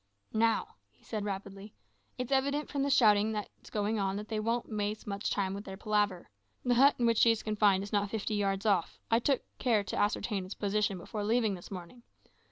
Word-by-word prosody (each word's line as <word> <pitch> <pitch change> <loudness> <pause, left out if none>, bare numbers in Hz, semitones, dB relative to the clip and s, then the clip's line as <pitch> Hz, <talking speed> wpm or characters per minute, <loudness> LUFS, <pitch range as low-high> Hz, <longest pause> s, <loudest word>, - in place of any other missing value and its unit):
"Now," 225 +1 +1 0.3
said 215 -2 -4
he 205 - -4
rapidly, 200 +1 -6 0.4
"it's 250 0 -4
evident 280 +2 +1
from 280 - -1
the 280 - +1
shouting 220 -5 +4
that's 210 -2 -7
going 210 +1 -1
on 195 -1 0
that 210 +1 -6
they 220 -1 -1
won't 230 +2 -1
waste 210 0 -3
much 200 0 -3
time 195 -1 -1
with 200 +1 -5
their 190 -2 -8
palaver. 205 -3 0 0.4
The 245 - +3
hut 275 +4 +6
in 240 - +1
which 230 -1 +3
she 230 - +6
is 225 -1 +1
confined 205 -3 +3
is 200 - -8
not 205 -1 +1
fifty 215 0 -3
yards 195 -1 0
off; 195 -6 +1
I 225 - +5
took 270 +2 +1 0.2
care 225 -6 +2
to 190 - -5
ascertain 205 -1 0
its 185 +2 -7
position 205 -1 0
before 205 +4 -5
leaving 220 0 +2
this 180 -2 -9
morning. 185 +5 -9
210 Hz, 210 wpm, -31 LUFS, 200-230 Hz, 0.4 s, hut